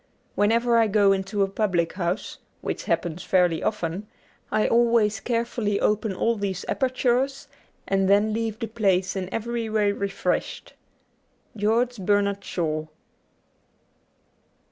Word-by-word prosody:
Whenever 230 +3 +3
I 225 - +4
go 205 -1 +4
into 195 +1 0
a - - +1
public 190 -4 0
house, 180 +1 -3 0.2
which - - -4
happens 175 0 -1
fairly 180 -3 +2
often, 190 0 -2 0.4
I 215 - +2
always 230 -3 +3
carefully 230 -2 -1
open 210 0 +1
all 230 +5 0
these 195 -2 -3
apertures 260 +1 0 0.4
and 195 -1 +1
then 205 +2 +4
leave 225 -1 -2
the 230 - -3
place 195 -4 +1
in 190 -1 -4
every 230 0 -3
way 210 -2 +2
refreshed. 200 -1 -3 0.4
' - - -41
George 240 +3 +2
Bernard 200 0 +1
Shaw.' 155 -3 -2
205 Hz, 125 wpm, -25 LUFS, 190-230 Hz, 0.4 s, I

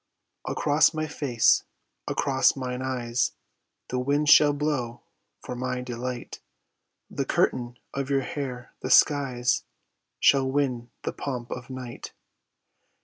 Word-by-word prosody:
Across 150 +2 +3
my 155 0 -1
face, 135 -6 +2 0.4
across 135 -1 +2
mine 125 -1 -4
eyes 125 -2 -1 0.6
The 125 - -1
winds 145 +3 +2
shall 150 -1 +8
blow 140 -5 -2 0.4
for 125 - -6
my 125 0 -2
delight 125 0 -5 0.7
The - - -1
curtain 120 -1 0 0.2
of 140 0 -3
your 135 -1 +2
hair, 125 -3 -5
the 130 - -5
skies 130 -4 +3 0.6
Shall 135 -1 +4
win 130 -4 -1
the - - -3
pomp 125 -4 -5
of 125 0 -6
night. 130 -2 -7
130 Hz, 120 wpm, -26 LUFS, 125-140 Hz, 0.7 s, shall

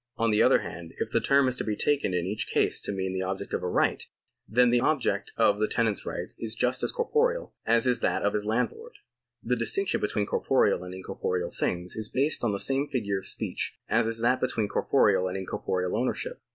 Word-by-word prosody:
On 115 0 +2
the 105 - +3
other - - +5
hand, 85 -1 -8
if - - -3
the - - +2
term 140 -1 +4
is 130 - 0
to - - -1
be 105 - -2
taken 145 -2 +1
in 90 -1 -1
each 105 +3 -2
case - - +1
to - - -4
mean 95 -1 -3
the 95 - -2
object 95 +1 -4
of - - -1
a 90 - -2
right, - - +1 0.4
then 125 +2 +4
the 120 - +4
object 145 +1 0
of 105 0 +3
the 110 - +2
tenant's 115 -3 0
right - - -3
is 115 0 -2
just 125 +2 0
as - - +3
corporeal 475 +1 0
as 115 +1 +4
is 125 -1 +2
that - - 0
of 105 - +1
his 105 - 0
landlord. 125 - -2 0.5
The 125 - +1
distinction 180 +12 0
between 105 0 0
corporeal 90 - +1
and 90 0 -8
incorporeal 90 -1 -3
things 90 0 -2
is 110 0 -1
based 140 +2 0
on 115 - +2
the 100 - -2
same 135 +5 0
figure 105 -8 -1
of - - -6
speech - - -3
as 115 0 +3
is 115 0 +1
that 125 +2 +2
between 115 -4 0
corporeal 100 -5 +2
and 90 +1 -3
incorporeal 90 -1 -2
ownership. - - -2
110 Hz, 220 wpm, -27 LUFS, 95-130 Hz, 0.5 s, other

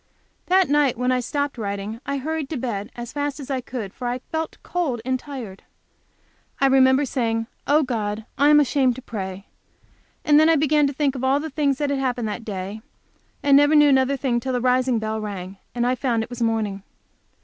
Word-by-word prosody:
That 375 0 +4
night 285 -4 +2
when 250 +1 +1
I 255 - +2
stopped 285 +1 -2
writing, 205 +2 -4
I 280 - -1
hurried 305 +1 -3
to 310 - -3
bed 220 -5 -3
as 240 0 -7
fast 290 0 -2
as 280 -1 -7
I 260 -1 -1
could, 235 -6 -6
for 250 - -5
I 245 +1 -1
felt 320 +5 -5
cold 320 -9 -2
and 260 0 0
tired. 245 -9 -8 1.0
I 275 - +3
remember 265 +1 +5
saying, 225 -4 -1 0.2
"Oh, 300 +2 +4
God, 220 -4 -3
I 285 +1 +4
am 300 0 +7
ashamed 265 -3 +2
to 260 - -10
pray," 195 -4 -6 0.8
and 295 0 +6
then 315 +1 +5
I 330 - +5
began 300 0 +3
to 280 - -3
think 280 -1 0
of 260 -2 -6
all 270 +2 +3
the 315 +1 -5
things 280 -2 +1
that 290 -1 -1
had 280 - 0
happened 250 -3 -1
that 220 +2 -5
day, 200 0 -5 0.6
and 280 -1 +5
never 290 +2 +5
knew 295 -1 +7
another 265 0 +3
thing 245 -3 0
till 260 +2 -3
the 250 - +1
rising 250 0 +2
bell 220 0 -2
rang 195 -2 -6 0.2
and 240 0 0
I 250 - +2
found 240 -3 0
it 225 - -10
was 245 0 -7
morning. 220 -4 0
255 Hz, 215 wpm, -23 LUFS, 225-285 Hz, 1.0 s, am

